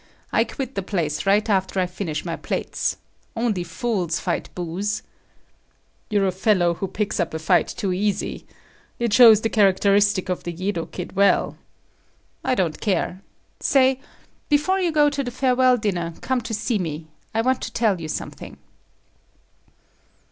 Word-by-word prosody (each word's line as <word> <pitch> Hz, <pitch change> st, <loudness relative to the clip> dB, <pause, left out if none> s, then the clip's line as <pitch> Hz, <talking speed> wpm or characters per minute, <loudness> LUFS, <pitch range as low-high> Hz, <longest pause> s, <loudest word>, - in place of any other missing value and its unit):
I -, -, +3 dB
quit 270 Hz, -1 st, -5 dB
the 195 Hz, -, -2 dB
place 165 Hz, -4 st, -2 dB
right 205 Hz, +3 st, +3 dB
after 190 Hz, -2 st, +1 dB
I 185 Hz, -, +2 dB
finish 175 Hz, -4 st, -4 dB
my 165 Hz, -1 st, -2 dB
plates. -, -, -2 dB, 0.4 s
Only 225 Hz, -6 st, 0 dB
fools 175 Hz, -1 st, -2 dB
fight -, -, -2 dB
booze." 185 Hz, +4 st, -3 dB, 1.1 s
"You're 205 Hz, -3 st, +2 dB
a 190 Hz, -, +2 dB
fellow 185 Hz, -2 st, +2 dB
who 195 Hz, +3 st, -4 dB
picks 200 Hz, +2 st, -2 dB
up -, -, -1 dB
a -, -, 0 dB
fight 160 Hz, +2 st, +2 dB
too 190 Hz, -2 st, -2 dB
easy. 200 Hz, +2 st, -2 dB, 0.5 s
It 235 Hz, -3 st, -1 dB
shows 225 Hz, -1 st, +9 dB
up 220 Hz, -, -7 dB
the 225 Hz, -, +1 dB
characteristic 200 Hz, -1 st, +3 dB
of 180 Hz, -1 st, -3 dB
the 175 Hz, -, -4 dB
Yedo 175 Hz, 0 st, -3 dB
kid 180 Hz, -, -7 dB
well." 200 Hz, +1 st, +3 dB, 0.9 s
"I 255 Hz, -, +1 dB
don't 170 Hz, -7 st, -1 dB
care. 190 Hz, -2 st, -1 dB, 0.4 s
Say, 265 Hz, -1 st, +3 dB, 0.5 s
before 300 Hz, +6 st, +2 dB
you 355 Hz, -3 st, +1 dB
go 300 Hz, -1 st, +4 dB
to 280 Hz, -1 st, -2 dB
the 245 Hz, -, -3 dB
farewell 255 Hz, 0 st, +3 dB
dinner, 175 Hz, -6 st, -2 dB
come 260 Hz, -1 st, -1 dB
to 225 Hz, 0 st, -6 dB
see 220 Hz, +1 st, -1 dB
me. 160 Hz, -3 st, -4 dB, 0.3 s
I 225 Hz, -, +3 dB
want 260 Hz, +1 st, +1 dB
to 225 Hz, -, -5 dB
tell 215 Hz, -7 st, +1 dB
you 160 Hz, -, -5 dB
something." -, -, -6 dB
200 Hz, 160 wpm, -23 LUFS, 180-235 Hz, 1.1 s, shows